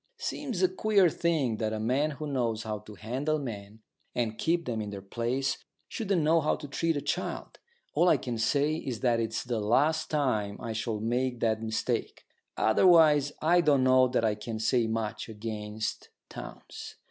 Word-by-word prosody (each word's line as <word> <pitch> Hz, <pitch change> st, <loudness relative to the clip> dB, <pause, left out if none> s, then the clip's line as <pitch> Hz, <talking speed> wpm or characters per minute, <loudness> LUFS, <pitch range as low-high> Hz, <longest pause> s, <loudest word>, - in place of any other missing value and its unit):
Seems 460 Hz, -, -3 dB
a -, -, +7 dB
queer 210 Hz, -, +3 dB
thing 145 Hz, -11 st, 0 dB
that 110 Hz, -1 st, -1 dB
a 110 Hz, -, -2 dB
man 130 Hz, +7 st, +1 dB
who 155 Hz, -, -5 dB
knows 120 Hz, -6 st, -1 dB
how 110 Hz, -1 st, -4 dB
to 105 Hz, 0 st, -12 dB
handle 130 Hz, +9 st, -2 dB
men 110 Hz, -6 st, -7 dB, 0.3 s
and 115 Hz, -2 st, -1 dB
keep 170 Hz, 0 st, +1 dB
them 115 Hz, -5 st, -2 dB
in 105 Hz, -, -4 dB
their 100 Hz, -1 st, -6 dB
place 120 Hz, +7 st, -2 dB, 0.3 s
shouldn't 195 Hz, -7 st, -1 dB
know 160 Hz, +2 st, +4 dB
how 150 Hz, -, +1 dB
to 145 Hz, -, -8 dB
treat 165 Hz, +3 st, 0 dB
a -, -, -2 dB
child. -, -, -4 dB, 0.3 s
All 175 Hz, +4 st, +4 dB
I -, -, +5 dB
can 120 Hz, -3 st, -4 dB
say 145 Hz, +6 st, +2 dB
is 130 Hz, -8 st, -5 dB
that 120 Hz, -3 st, +2 dB
it's 115 Hz, -1 st, -2 dB
the 120 Hz, -2 st, -2 dB
last 140 Hz, +10 st, +2 dB
time 110 Hz, -9 st, 0 dB
I 115 Hz, -2 st, -4 dB
shall 110 Hz, 0 st, -2 dB
make 125 Hz, +3 st, -1 dB
that 110 Hz, -1 st, +1 dB
mistake. 110 Hz, 0 st, -2 dB, 0.3 s
Otherwise 150 Hz, +2 st, +5 dB
I 175 Hz, +3 st, +5 dB
don't 145 Hz, -5 st, +3 dB
know 130 Hz, 0 st, +5 dB
that 120 Hz, -2 st, +1 dB
I 110 Hz, -, +2 dB
can 110 Hz, +2 st, -5 dB
say 115 Hz, +1 st, +2 dB
much 110 Hz, 0 st, -3 dB
against 105 Hz, 0 st, -5 dB, 0.2 s
Townes. -, -, -9 dB
120 Hz, 180 wpm, -29 LUFS, 110-150 Hz, 0.3 s, a